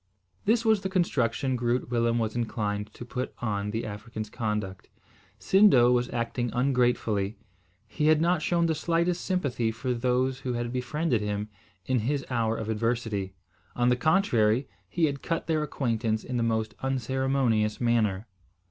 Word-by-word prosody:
This 230 +2 +2
was 220 -3 +4
the 190 - -2
construction 135 - 0
Groot 120 0 -1
Willem 115 -1 +2
was 110 -1 -1
inclined 105 -3 -2
to 120 - -8
put 125 +1 -4
on 105 -3 -2
the 110 +2 -3
African's 110 +1 -6
conduct. 105 -4 -3 0.5
Sindo 190 -12 +5
was 125 0 +1
acting 120 0 -2
ungratefully. 120 -5 +1 0.5
He 150 - -1
had 155 -1 +5
not 170 0 +2
shown 170 +1 +1
the 165 - +2
slightest 170 +3 0
sympathy 140 -11 0
for 125 +3 -2
those 125 +2 0
who 130 -2 -3
had 120 0 -3
befriended 125 0 0
him 105 0 -3 0.4
in 130 +2 +1
his 135 +5 -1
hour 115 -2 0
of 110 - -4
adversity. 110 -3 -1 0.4
On 120 0 +2
the 125 - +4
contrary, 125 - +2 0.2
he 170 -2 +2
had 140 -2 -2
cut 165 -1 -2
their 155 -1 +1
acquaintance 115 -6 -1
in 125 - -5
the - - +1
most 110 -1 0
unceremonious 130 -4 0
manner. 115 -4 +1
120 Hz, 155 wpm, -27 LUFS, 110-140 Hz, 0.5 s, Sindo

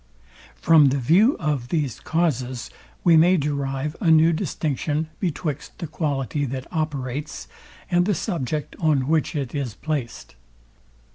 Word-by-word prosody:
From 155 -3 +5
the 135 - 0
view 180 - +4
of 145 -6 -2
these 145 -7 -1
causes 130 -7 -1 0.3
we 170 -2 +6
may 175 +4 +5
derive 140 0 -2
a 175 - +2
new 160 +1 +6
distinction 155 -2 -2
betwixt 165 -5 -3
the - - -5
quality 145 -2 -2
that 130 -1 -4
operates, 150 -3 -3 0.4
and 175 +1 +3
the 205 - +2
subject 155 - -3
on 145 -5 +2
which 160 +1 +1
it 135 -4 -3
is 135 -7 -3
placed. 145 -7 -4
150 Hz, 135 wpm, -23 LUFS, 135-165 Hz, 0.4 s, we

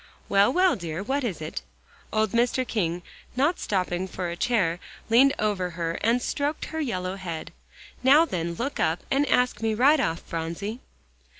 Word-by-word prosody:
"Well, 200 +3 +4
well, 365 +5 +4
dear, 170 0 -5
what 275 +5 -1
is 195 -10 -3
it?" 155 - -4 0.5
Old 215 -2 +1
Mr. 245 +2 +1
King, 175 -5 -1 0.3
not 290 +7 +2
stopping 185 -2 -1
for 180 -1 -4
a - - -4
chair, 180 -6 +1 0.3
leaned 270 +4 +6
over 200 -4 0
her 165 -1 -2
and 235 +2 +2
stroked 290 +1 -2
her 320 - -5
yellow 185 -8 -2
head. 170 -3 -6 0.5
"Now, 285 +6 +6
then, 170 - -3
look 270 +9 -3
up, 160 +2 +1
and 280 +2 +2
ask 250 -4 +2
me 220 -1 0
right 285 +7 +5
off, 165 -10 0
Phronsie." 170 +8 -4
210 Hz, 170 wpm, -26 LUFS, 175-255 Hz, 0.5 s, leaned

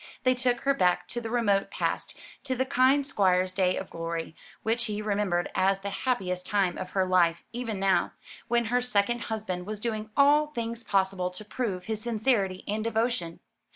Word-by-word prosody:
They 255 - +4
took 245 -1 0
her 275 - +3
back 180 -7 +2
to 240 - -3
the 225 - -5
remote 215 -5 +1
past, - - -2 0.3
to 260 -1 -1
the 260 +1 0
kind 265 +1 +3
Squire's 185 -7 +2
day 185 -1 +2
of - - -6
glory, 165 -1 -4 0.3
which 225 +2 +1
she 215 -3 -2
remembered 200 -4 0
as 195 +1 +2
the 200 0 -4
happiest 190 -5 -1
time 195 -4 +1
of 185 - -5
her 190 -1 +2
life; 175 -2 +3
even 230 -4 -3
now, 195 0 +2 0.3
when 235 0 +2
her 250 - +4
second 240 -1 +1
husband 205 -5 -4
was 215 -1 -4
doing 215 -1 -3
all 290 +2 +5
things 235 -5 -4
possible 190 -3 +1
to 180 +4 -9
prove 200 -6 -3
his 220 -1 -2
sincerity 215 -5 0
and 215 +1 -1
devotion. 225 -7 -1
210 Hz, 185 wpm, -28 LUFS, 185-240 Hz, 0.3 s, all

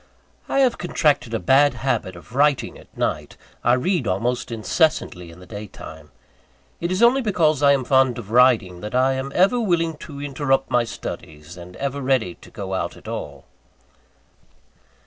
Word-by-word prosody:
I 275 - +2
have 255 -3 +2
contracted 150 -8 +1
a 115 - -1
bad 135 +2 +4
habit 115 -7 -2
of 85 +6 -14
writing 145 0 +2
at - - -17
night - - -2 0.3
I 120 - +4
read 130 - 0
almost 120 +7 -1
incessantly 110 - 0
in 85 +1 -14
the 90 - -13
day 105 +3 -8
time. 80 -5 -12 0.7
It 170 +1 -2
is 185 +5 +1
only 255 +3 +5
because 165 - +1
I 140 -1 +6
am 135 -2 0
fond 130 -1 +3
of 110 -3 -8
riding, 115 -8 +3
that 105 +5 -5
I 130 +1 +3
am 135 +1 -4
ever 195 +7 +4
willing 170 -7 0
to 145 -2 -10
interrupt 135 -1 -1
my 120 -1 +3
studies, 75 -6 -8
and 90 +1 -11
ever 140 +1 -3
ready 130 -9 +1
to - - -17
go 95 -2 -6
out 95 - -3
at - - -15
all. - - -6
130 Hz, 175 wpm, -22 LUFS, 105-150 Hz, 0.7 s, I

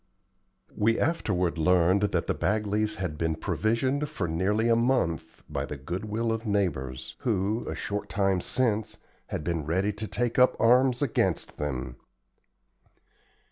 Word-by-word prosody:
We 115 +2 +2
afterward 90 - 0
learned 90 +3 +4
that - - 0
the - - 0
Bagleys 105 +1 0
had 90 -5 -4
been 80 -1 0
provisioned 130 - 0
for 85 - -3
nearly 100 +7 +1
a 115 - +5
month 115 - 0
by - - -3
the 75 - -6
good 85 +9 -5
will 115 +2 -1
of 115 0 -3
neighbors, 65 -11 -1
who, 110 -3 -1
a - - -3
short 105 0 -4
time 95 -2 +1
since, 110 -3 0 0.3
had - - -4
been 85 -1 -1
ready 95 +5 +1
to 110 +2 -5
take 120 +2 -1
up 125 - +5
arms 125 +1 +4
against - - 0
them. 65 -4 -3
105 Hz, 145 wpm, -27 LUFS, 85-115 Hz, 0.3 s, a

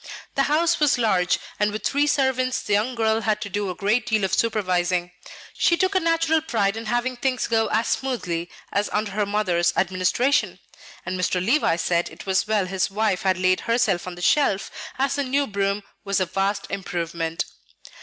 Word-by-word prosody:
The 275 +1 +1
house 325 +3 +2
was 295 -4 +3
large; 190 -7 +2 0.2
and 210 0 +2
with 210 0 -5
three 285 +1 +2
servants 260 -2 +1
the 205 - -1
young 220 +5 +1
girl 220 -1 +1
had 215 -1 0
to 200 - -4
do 205 -1 -1
a 180 - -4
great 215 +5 0
deal 220 -2 +1
of 190 - -1
supervising. 180 -5 0 0.4
She 340 - +2
took 375 +2 +1
a 380 - +3
natural 330 -2 +2
pride 210 -9 0
in 225 0 -6
having 240 +3 0
things 255 +1 -1
go 225 -1 +1
as 220 +3 0
smoothly 175 -11 -2 0.2
as 205 +1 0
under 210 -1 -1
her 205 +1 -1
mother's 180 -5 +1
administration; 190 +10 +1 0.5
and 185 0 -3
Mr. 180 0 +1
Levice 185 - +2
said 175 -1 +1
it - - -12
was 190 +1 +1
well 210 -3 +1
his 185 0 -1
wife 205 -2 0
had 190 -2 +1
laid 185 0 +2
herself 220 -7 0
on 180 - -6
the 175 - -8
shelf, 205 -8 +2 0.3
as 270 +1 +1
the 285 0 0
new 275 +2 +1
broom 200 -2 -1 0.2
was 200 -1 0
a 185 - +1
vast 195 +3 -1
improvement. 170 -4 -3
210 Hz, 195 wpm, -23 LUFS, 185-255 Hz, 0.5 s, was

